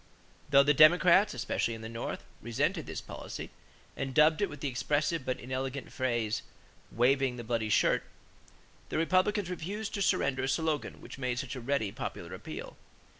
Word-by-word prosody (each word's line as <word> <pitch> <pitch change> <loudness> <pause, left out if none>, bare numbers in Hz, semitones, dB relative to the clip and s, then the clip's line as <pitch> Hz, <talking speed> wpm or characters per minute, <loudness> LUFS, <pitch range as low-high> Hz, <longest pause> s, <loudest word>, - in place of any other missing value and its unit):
Though 140 -1 +7
the 145 +1 +4
Democrats, 175 +4 +6
especially 120 -1 -1
in 110 - -9
the - - -5
North, 115 +1 -5 0.2
resented 115 0 -1
this - - -5
policy - - -7 0.4
and 135 -1 -4
dubbed 155 +3 +5
it 205 - +1
with 145 - -9
the 145 - -2
expressive 145 +4 0
but 130 -1 -2
inelegant 130 +2 -4
phrase, 120 -4 -1 0.5
"waving 130 +2 +2
the 120 - -6
bloody 115 -1 -1
shirt," - - +3 0.9
the - - -2
Republicans 185 +3 +2
refused 200 +5 -4
to 200 - -2
surrender 140 -8 +2
a - - -1
slogan 155 +2 -1
which - - -10
made 125 -2 -1
such 130 +1 -4
a 130 - -6
ready 120 -5 0
popular - - -6
appeal. - - -8
135 Hz, 170 wpm, -31 LUFS, 120-160 Hz, 0.9 s, Though